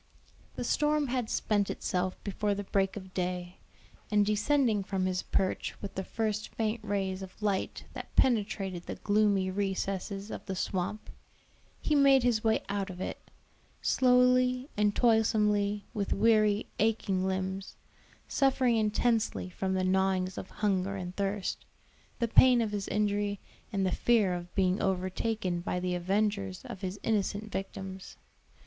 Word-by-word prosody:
The -, -, -3 dB
storm 300 Hz, -2 st, +1 dB
had 245 Hz, -3 st, -1 dB
spent 205 Hz, -2 st, +1 dB
itself 185 Hz, 0 st, -2 dB
before 205 Hz, +1 st, -1 dB
the 205 Hz, -, -4 dB
break 195 Hz, 0 st, 0 dB
of 190 Hz, -2 st, -9 dB
day, 180 Hz, 0 st, -3 dB, 0.5 s
and 210 Hz, -1 st, +3 dB
descending 215 Hz, 0 st, +2 dB
from 190 Hz, -1 st, -1 dB
his 185 Hz, -1 st, 0 dB
perch 190 Hz, -1 st, -1 dB
with 200 Hz, -, -6 dB
the 190 Hz, -, -3 dB
first 215 Hz, 0 st, -2 dB
faint 220 Hz, 0 st, -1 dB
rays 195 Hz, -2 st, -2 dB
of 190 Hz, -1 st, -10 dB
light 205 Hz, -3 st, -1 dB
that -, -, -9 dB
penetrated 200 Hz, -7 st, +1 dB
the -, -, -4 dB
gloomy 205 Hz, -2 st, +2 dB
recesses 195 Hz, +1 st, -2 dB
of -, -, -6 dB
the 190 Hz, -, -3 dB
swamp, 190 Hz, +3 st, -3 dB, 0.7 s
he 305 Hz, -, 0 dB
made 275 Hz, -3 st, +6 dB
his 235 Hz, -3 st, +2 dB
way 220 Hz, -1 st, +2 dB
out 200 Hz, 0 st, -2 dB
of 180 Hz, -1 st, -8 dB
it, -, -, -6 dB, 0.5 s
slowly 250 Hz, +1 st, +3 dB
and 210 Hz, 0 st, +2 dB
toilsomely, 210 Hz, -3 st, +2 dB
with 200 Hz, -2 st, -1 dB
weary, 215 Hz, -2 st, +3 dB
aching 200 Hz, -4 st, +1 dB
limbs, 190 Hz, +1 st, -3 dB, 0.5 s
suffering 260 Hz, -4 st, +2 dB
intensely 220 Hz, -2 st, +1 dB
from 190 Hz, +1 st, -2 dB
the 185 Hz, -, +1 dB
gnawings 185 Hz, 0 st, +1 dB
of -, -, -7 dB
hunger 195 Hz, -2 st, 0 dB
and 180 Hz, -1 st, -6 dB
thirst, 200 Hz, -1 st, -2 dB, 0.5 s
the 235 Hz, -, 0 dB
pain 250 Hz, +2 st, +6 dB
of 225 Hz, -3 st, 0 dB
his 205 Hz, -2 st, -3 dB
injury, 205 Hz, -1 st, 0 dB, 0.3 s
and 195 Hz, -2 st, 0 dB
the 185 Hz, -, +1 dB
fear 220 Hz, -6 st, +3 dB
of 175 Hz, 0 st, -6 dB
being 185 Hz, 0 st, +2 dB
overtaken 185 Hz, 0 st, -1 dB
by 180 Hz, +1 st, -2 dB
the 180 Hz, 0 st, -1 dB
avengers 195 Hz, +1 st, -1 dB
of 235 Hz, -7 st, -8 dB
his 190 Hz, +2 st, -4 dB
innocent 210 Hz, -1 st, -1 dB
victims. 190 Hz, -1 st, -6 dB
200 Hz, 150 wpm, -30 LUFS, 190-220 Hz, 0.7 s, made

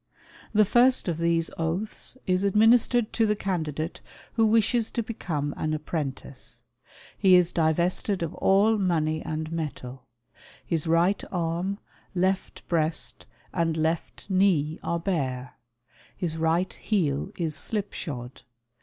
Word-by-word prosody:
The 215 Hz, -1 st, +5 dB
first 245 Hz, +3 st, +4 dB
of 165 Hz, -2 st, -1 dB
these 170 Hz, 0 st, +1 dB
oaths 180 Hz, +10 st, -2 dB
is 185 Hz, +1 st, +1 dB
administered 225 Hz, +3 st, +4 dB
to 225 Hz, -2 st, +2 dB
the 210 Hz, -, +2 dB
candidate 160 Hz, -5 st, -3 dB, 0.3 s
who 225 Hz, -1 st, +3 dB
wishes 225 Hz, +1 st, +3 dB
to 235 Hz, -, -2 dB
become 150 Hz, -10 st, -3 dB
an 155 Hz, 0 st, -1 dB
apprentice. 135 Hz, -6 st, -5 dB, 0.5 s
He 190 Hz, -3 st, +5 dB
is 180 Hz, -1 st, +4 dB
divested 170 Hz, +4 st, +1 dB
of 160 Hz, -, -3 dB
all 210 Hz, +3 st, +3 dB
money 160 Hz, -4 st, +1 dB
and 155 Hz, 0 st, -4 dB
metal. 135 Hz, -6 st, -5 dB, 0.6 s
His 165 Hz, -1 st, -1 dB
right 170 Hz, +4 st, +3 dB
arm, 175 Hz, +2 st, -1 dB, 0.4 s
left 190 Hz, +1 st, -1 dB
breast 160 Hz, -2 st, 0 dB, 0.3 s
and 165 Hz, -1 st, 0 dB
left 160 Hz, +1 st, -2 dB
knee 185 Hz, -6 st, +2 dB
are 170 Hz, -, -1 dB
bare. 135 Hz, -8 st, -2 dB, 0.6 s
His 165 Hz, -3 st, -2 dB
right 165 Hz, +3 st, +1 dB
heel 175 Hz, -5 st, -1 dB
is 165 Hz, -3 st, -1 dB
slipshod. 150 Hz, -, -4 dB
170 Hz, 125 wpm, -26 LUFS, 155-200 Hz, 0.6 s, The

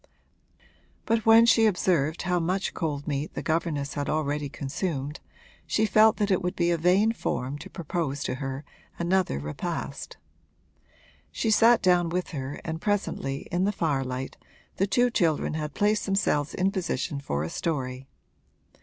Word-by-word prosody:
But 225 Hz, -1 st, 0 dB
when 225 Hz, +1 st, +8 dB
she 225 Hz, -1 st, +5 dB
observed 170 Hz, -6 st, +1 dB
how 180 Hz, -1 st, +1 dB
much 185 Hz, +4 st, -1 dB
cold 150 Hz, -3 st, -3 dB
meat 145 Hz, 0 st, -3 dB
the -, -, -4 dB
governess 155 Hz, -3 st, -1 dB
had 145 Hz, -1 st, -3 dB
already 150 Hz, -1 st, -1 dB
consumed 145 Hz, +1 st, -4 dB, 0.5 s
she 220 Hz, -, +2 dB
felt 215 Hz, +2 st, +5 dB
that 205 Hz, -2 st, 0 dB
it 190 Hz, -, +2 dB
would 180 Hz, +1 st, -2 dB
be 175 Hz, 0 st, +2 dB
a 170 Hz, -, +2 dB
vain 190 Hz, +6 st, +4 dB
form 140 Hz, -, -3 dB
to -, -, -9 dB
propose 155 Hz, -5 st, -3 dB
to -, -, -2 dB
her 135 Hz, +1 st, -4 dB, 0.3 s
another 180 Hz, -, +1 dB
repast. 75 Hz, +2 st, -5 dB, 1.1 s
She 225 Hz, -, 0 dB
sat 230 Hz, +2 st, +5 dB
down 180 Hz, -2 st, +4 dB
with 180 Hz, +2 st, -2 dB
her 140 Hz, -2 st, -5 dB
and 160 Hz, 0 st, -4 dB
presently, 190 Hz, -9 st, -1 dB
in 180 Hz, +2 st, +1 dB
the 205 Hz, -, +2 dB
firelight, 135 Hz, -8 st, -2 dB, 0.4 s
the 195 Hz, -, +2 dB
two 245 Hz, +5 st, +2 dB
children 160 Hz, -9 st, +1 dB
had 150 Hz, -1 st, -4 dB
placed 210 Hz, +1 st, +1 dB
themselves 195 Hz, -7 st, 0 dB
in 190 Hz, +1 st, +1 dB
position 170 Hz, -7 st, -2 dB
for 75 Hz, -, -2 dB
a 80 Hz, -, -3 dB
story. 130 Hz, -5 st, -3 dB
170 Hz, 155 wpm, -27 LUFS, 140-195 Hz, 1.1 s, when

